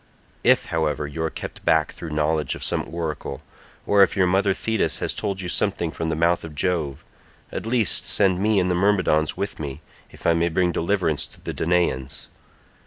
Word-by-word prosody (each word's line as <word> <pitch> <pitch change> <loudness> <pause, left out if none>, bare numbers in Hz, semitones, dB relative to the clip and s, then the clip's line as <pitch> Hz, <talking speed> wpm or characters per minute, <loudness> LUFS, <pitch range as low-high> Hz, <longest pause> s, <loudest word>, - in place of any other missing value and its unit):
If - - +4
however 75 -2 0
you 75 +3 -5
are 80 - 0
kept - - -8
back 80 -1 +3
through 85 - -8
knowledge 75 -1 0
of - - -7
some - - -1
oracle, 80 -4 -4 0.4
or 100 -1 +4
if 100 - +4
your 95 - +4
mother 95 +2 +2
Thetis 110 -4 0
has - - -1
told 100 -2 -3
you 90 - -4
something 85 -2 0
from 80 0 -3
the 80 - 0
mouth 85 +2 +2
of 80 -2 -8
Jove, 80 -4 -1 0.5
at - - -5
least 115 -3 +1
send 95 -3 +3
me 105 -1 +3
and 90 0 +1
the - - +2
Myrmidons 90 -5 +2
with 100 +1 -3
me, 70 -1 -5 0.3
if - - -15
I 85 - +5
may 85 +1 +1
bring 90 +1 +1
deliverance 85 -3 0
to - - -16
the - - -5
Danaans. 75 -6 -1
85 Hz, 195 wpm, -23 LUFS, 80-95 Hz, 0.5 s, I